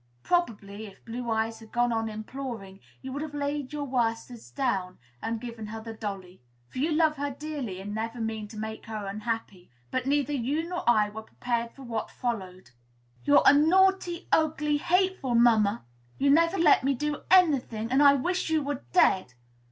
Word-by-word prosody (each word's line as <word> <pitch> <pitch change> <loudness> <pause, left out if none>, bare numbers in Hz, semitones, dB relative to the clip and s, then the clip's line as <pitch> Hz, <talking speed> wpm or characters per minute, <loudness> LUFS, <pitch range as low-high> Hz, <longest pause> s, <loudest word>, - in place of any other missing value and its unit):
Probably, 220 - -1
if 195 - -16
Blue 235 +1 -5
Eyes 225 0 -1
had 220 -1 -15
gone 240 0 +1
on 225 -1 -1
imploring, 215 -3 -7 0.2
you 265 - -6
would 285 - -3
have 305 -1 -6
laid 285 -1 -2
your 295 -1 -3
worsteds 235 -2 -2
down, 195 -10 -2 0.2
and 225 0 -2
given 230 -2 -7
her 220 +1 -6
the 225 0 -7
dolly; 195 - -7 0.3
for - - -7
you 310 +5 +1
love 310 -1 +3
her 285 +1 -2
dearly, 280 -8 -5
and 205 +2 -6
never 225 +2 -4
mean 220 -1 -3
to 215 - -11
make 220 +1 -6
her 215 -2 -5
unhappy. 210 -2 -4 0.2
But 255 0 -1
neither 290 0 +1
you 285 +5 -1
nor 355 0 -4
I 215 -3 +4
were 215 +1 -7
prepared 235 +1 -3
for 275 - -12
what 230 -3 -4
followed. 190 - -5 0.5
"You're 145 - +6
a - - +9
naughty, 350 +3 +3
ugly, 305 -2 +2
hateful 360 -6 +1
mamma! 225 - +4 0.3
You 275 0 +3
never 335 +5 +4
let 320 -7 +5
me 275 +1 +2
do 295 +3 -2
any 350 -7 +6
thing, 225 -1 -6
and 265 +2 +4
I 280 -1 +7
wish 355 +6 -1
you 315 -2 +1
were 285 -1 -4
dead!" 185 - +3
240 Hz, 185 wpm, -28 LUFS, 220-290 Hz, 0.5 s, a